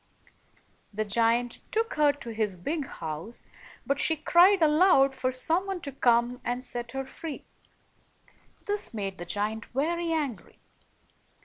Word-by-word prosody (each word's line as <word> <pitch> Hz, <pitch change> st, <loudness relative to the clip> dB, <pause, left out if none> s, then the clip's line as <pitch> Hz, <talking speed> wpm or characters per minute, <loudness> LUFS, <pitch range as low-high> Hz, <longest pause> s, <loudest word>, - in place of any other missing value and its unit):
The 215 Hz, +1 st, -2 dB
giant 230 Hz, +3 st, +1 dB
took 455 Hz, +2 st, 0 dB
her 295 Hz, -1 st, +4 dB
to 255 Hz, -5 st, -8 dB
his 215 Hz, -4 st, -1 dB
big 285 Hz, -, -3 dB
house, 165 Hz, -, -6 dB, 0.4 s
but 280 Hz, 0 st, 0 dB
she 320 Hz, -, +3 dB
cried 345 Hz, +4 st, +5 dB
aloud 300 Hz, -3 st, +5 dB
for 255 Hz, -1 st, -1 dB
some 325 Hz, +9 st, 0 dB
one 385 Hz, -2 st, -3 dB
to 280 Hz, -, -5 dB
come 245 Hz, -1 st, +2 dB
and 245 Hz, +1 st, -2 dB
set 240 Hz, -1 st, -6 dB
her 270 Hz, 0 st, -3 dB
free. 295 Hz, +3 st, -8 dB, 1.2 s
This 410 Hz, -, -1 dB
made 195 Hz, -3 st, -4 dB
the 175 Hz, -, -5 dB
giant 210 Hz, +4 st, -2 dB
very 335 Hz, +5 st, -1 dB
angry. 280 Hz, -, -3 dB
260 Hz, 140 wpm, -28 LUFS, 225-320 Hz, 1.2 s, cried